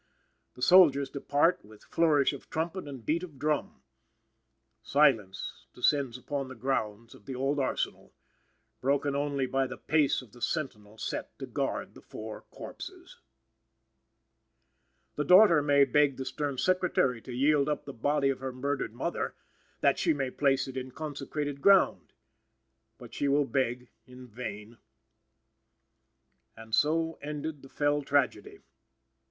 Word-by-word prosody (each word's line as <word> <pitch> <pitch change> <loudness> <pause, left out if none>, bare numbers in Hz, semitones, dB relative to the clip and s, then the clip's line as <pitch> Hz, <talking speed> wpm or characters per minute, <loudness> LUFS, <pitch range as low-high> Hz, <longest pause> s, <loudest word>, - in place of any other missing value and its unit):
The 125 - -7
soldiers 145 -7 +6
depart 145 +4 +1
with 105 0 -16
flourish 150 -4 +2
of 140 - -10
trumpet 165 +1 -3
and 135 -5 -9
beat 165 +3 +1
of 165 -6 -9
drum. 150 +2 -2 1.0
Silence 115 -10 +1
descends 130 -1 +1
on 140 -2 -2
the 130 - -9
grounds 115 -3 -3
of 100 - -18
the 130 - -5
old 135 +3 0
Arsenal; 135 - -2 0.7
broken 140 +1 +1
only 140 -1 0
by 135 +1 0
the 130 - -8
pace 150 -4 +1
of 115 - -18
the 120 - -16
sentinel 110 -10 -3
set - - -5
to - - -6
guard - - -3
the - - -14
four 110 0 -8
corpses. - - -10 2.0
The 150 - +1
daughter 180 -1 +7
may 145 -1 +4
beg 140 0 +2
the 130 - -4
stern 140 +1 -3
Secretary 180 -9 +1
to 130 - -10
yield 140 +3 +2
up 150 - -2
the 140 - -7
body 140 +3 +1
of 135 - -1
her 130 0 -4
murdered 140 +3 -3
mother, - - -3 0.5
that - - +3
she - - +2
may 135 -2 -2
place 135 -1 +1
it 130 0 -7
in 130 0 -4
consecrated 145 0 -5
ground. 195 -2 +4 0.9
But - - -12
she 145 - -1
will 140 +1 +3
beg 125 -2 -2 0.2
in 125 0 -12
vain. 110 -1 -8 1.8
And 110 0 -12
so 160 +4 +2
ended 150 0 -5
the 135 - -14
fell 145 +1 +1
tragedy. 140 -3 0
140 Hz, 145 wpm, -29 LUFS, 125-150 Hz, 2.0 s, daughter